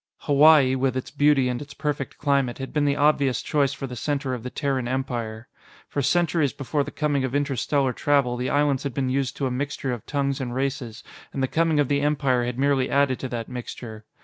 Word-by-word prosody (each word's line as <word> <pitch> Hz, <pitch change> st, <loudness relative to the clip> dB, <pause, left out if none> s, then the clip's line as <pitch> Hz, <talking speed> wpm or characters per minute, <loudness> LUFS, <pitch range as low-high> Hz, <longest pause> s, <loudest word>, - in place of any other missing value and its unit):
Hawaii, 145 Hz, -2 st, +6 dB
with 130 Hz, -1 st, 0 dB
its 130 Hz, -, -5 dB
beauty 145 Hz, -3 st, +3 dB
and 125 Hz, 0 st, -2 dB
its 140 Hz, -1 st, -10 dB
perfect 145 Hz, -2 st, -3 dB
climate, 140 Hz, -4 st, +1 dB
had 135 Hz, 0 st, -7 dB
been 150 Hz, -1 st, +1 dB
the 140 Hz, -1 st, +2 dB
obvious 145 Hz, -3 st, +2 dB
choice 140 Hz, -2 st, +1 dB
for 135 Hz, -1 st, -5 dB
the 125 Hz, -2 st, -7 dB
center 140 Hz, +1 st, -2 dB
of 125 Hz, -, -4 dB
the 125 Hz, -, -5 dB
Terran 135 Hz, -3 st, -2 dB
Empire. 120 Hz, -3 st, -3 dB, 0.4 s
For 145 Hz, -, -2 dB
centuries 160 Hz, 0 st, +2 dB
before 145 Hz, +1 st, -1 dB
the -, -, -6 dB
coming 145 Hz, -3 st, 0 dB
of 130 Hz, +1 st, -2 dB
interstellar 140 Hz, -1 st, 0 dB
travel, 140 Hz, -2 st, +1 dB
the 125 Hz, +1 st, -2 dB
islands 145 Hz, -2 st, +2 dB
had 140 Hz, -4 st, -4 dB
been 130 Hz, -2 st, 0 dB
used 135 Hz, -1 st, -1 dB
to 140 Hz, -, -1 dB
a 130 Hz, -, -1 dB
mixture 135 Hz, 0 st, -2 dB
of 120 Hz, -, -6 dB
tongues 140 Hz, -2 st, -1 dB
and 125 Hz, -2 st, -4 dB
races, 130 Hz, -4 st, -3 dB, 0.3 s
and 135 Hz, -, -2 dB
the -, -, +2 dB
coming 160 Hz, +1 st, +1 dB
of 145 Hz, -, +3 dB
the 140 Hz, +1 st, +1 dB
Empire 140 Hz, -4 st, +1 dB
had 120 Hz, 0 st, -4 dB
merely 135 Hz, -1 st, +2 dB
added 140 Hz, -2 st, +2 dB
to 130 Hz, -, -4 dB
that 115 Hz, -2 st, -4 dB
mixture. 120 Hz, -3 st, -7 dB
135 Hz, 220 wpm, -24 LUFS, 125-145 Hz, 0.4 s, Hawaii